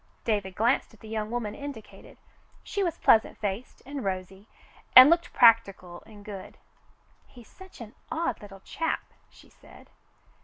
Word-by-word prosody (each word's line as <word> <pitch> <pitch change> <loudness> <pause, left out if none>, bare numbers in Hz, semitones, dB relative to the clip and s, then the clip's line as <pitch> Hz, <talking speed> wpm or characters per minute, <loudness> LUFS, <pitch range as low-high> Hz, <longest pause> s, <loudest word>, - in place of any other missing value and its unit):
David 205 -4 -2
glanced 235 +1 0
at 205 - -27
the 220 - -12
young 215 -1 -4
woman 230 -3 -4
indicated. 280 -6 -11 0.5
She 405 - -4
was 345 -4 -1
pleasant 220 - +3
faced 205 +3 -6
and 275 -1 -6
rosy, 190 +1 -5 0.5
and 255 +4 +11
looked 340 0 +1
practical 195 -7 +3
and 205 -2 -15
good. 200 -3 -10 0.7
"He's 240 -3 -16
such 380 -1 -16
an 225 0 -10 0.2
odd 315 -8 -2
little 195 -2 -13
chap," 325 +9 -3 0.3
she - - -20
said. - - -19
220 Hz, 150 wpm, -27 LUFS, 200-260 Hz, 0.7 s, and